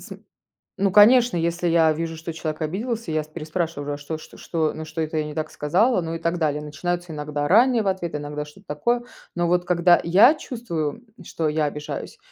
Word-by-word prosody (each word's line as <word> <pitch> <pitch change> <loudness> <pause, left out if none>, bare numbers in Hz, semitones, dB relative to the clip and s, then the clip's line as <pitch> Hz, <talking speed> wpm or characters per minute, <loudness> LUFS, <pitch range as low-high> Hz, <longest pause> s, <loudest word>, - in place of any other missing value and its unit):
См - - -11 0.5
ну 195 0 +1
конечно, 230 +1 +6
если 170 +1 0
я 165 -1 +4
вижу, 165 +1 -4
что 160 +1 -6
человек 155 0 -5
обиделся, 220 +7 -3
я 155 0 0
с - - -17
переспрашиваю, 155 -2 -3
а - - -4
что 150 +2 -5
что - - -14
что, 160 -2 -1
на 160 - -6
что 155 +1 -7
это 155 0 -3
я 155 - +1
не 150 - -6
так 155 0 -3
сказала? 185 - +2
Ну 165 0 -4
и - - -5
так 170 +1 -1
далее. 150 -3 0
Начинаются 175 +3 -4
иногда 150 -1 -3
ранние 235 - +5
в - - -2
ответы, 175 -5 -2
иногда 150 0 -5
что-то 190 +7 -17
такое. 240 +12 0 0.3
Но 175 -1 +1
вот 175 +1 +2
когда 175 0 +4
я 195 - +6
чувствую, 230 - -4 0.2
что 160 -1 -2
я 155 +1 0
обижаюсь, 150 0 -5
165 Hz, 210 wpm, -23 LUFS, 155-185 Hz, 0.5 s, конечно